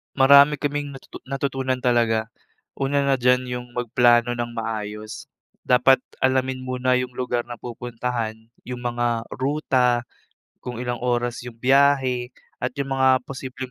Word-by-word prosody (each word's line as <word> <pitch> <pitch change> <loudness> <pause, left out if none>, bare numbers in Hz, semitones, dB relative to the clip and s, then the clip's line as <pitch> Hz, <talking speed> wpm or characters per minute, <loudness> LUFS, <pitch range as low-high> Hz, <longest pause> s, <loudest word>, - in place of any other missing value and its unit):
Marami 140 +2 +7
kaming 145 -1 -3
natutu 135 - -11
natutunan 135 -1 -1
talaga. 115 -2 +1 0.4
Una 140 +1 0
na 135 -2 +1
diyan 125 +1 +3
'yung 125 0 -5
magplano 120 0 +3
ng 120 0 -2
maayos. 110 -1 -5 0.3
Dapat 125 +1 +4 0.2
alamin 130 0 +1
muna 130 0 0
'yung 125 0 -1
lugar 125 -1 -2
na 120 -1 -9
pupuntahan, 120 -1 -4 0.3
'yung 125 -1 -6
mga 120 -1 -1
ruta, 130 -3 0 0.5
kung 120 -1 -6
ilang 120 -1 -3
oras 120 0 -1
'yung 120 - -8
biyahe 130 0 +2 0.2
at 125 0 -3
'yung 140 -1 -4
mga 130 -1 +4
posibleng 130 -1 -7
125 Hz, 135 wpm, -23 LUFS, 120-130 Hz, 0.5 s, Marami